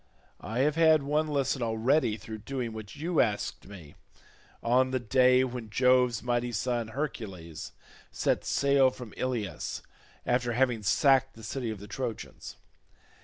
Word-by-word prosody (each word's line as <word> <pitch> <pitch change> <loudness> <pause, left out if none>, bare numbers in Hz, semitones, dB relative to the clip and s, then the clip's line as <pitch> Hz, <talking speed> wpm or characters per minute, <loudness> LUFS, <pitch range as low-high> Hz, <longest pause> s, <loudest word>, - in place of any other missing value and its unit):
I 115 +5 -2
have 150 +3 +1
had 160 -3 +5
one 150 +2 +1
lesson 140 -3 0
already 115 +1 +1
through 110 +1 -8
doing 120 0 -4
what 110 -1 -8
you 165 +3 +1
asked 105 -4 -2
me, 90 -7 -12 0.7
on 125 +2 +3
the 130 0 0
day 130 +1 +4
when 125 -3 -5
Jove's 125 0 +3
mighty 120 0 0
son 120 +2 -1
Hercules 110 - -6 0.4
set - - 0
sail 140 -1 +3
from 125 -4 -10
Ilius 120 -6 -3 0.4
after 125 -1 +1
having 120 -2 +1
sacked 135 +5 +3
the 115 - -13
city 120 +1 -3
of 110 -2 -5
the 100 - -9
Trojans. 120 -3 -6
125 Hz, 145 wpm, -29 LUFS, 110-135 Hz, 0.7 s, had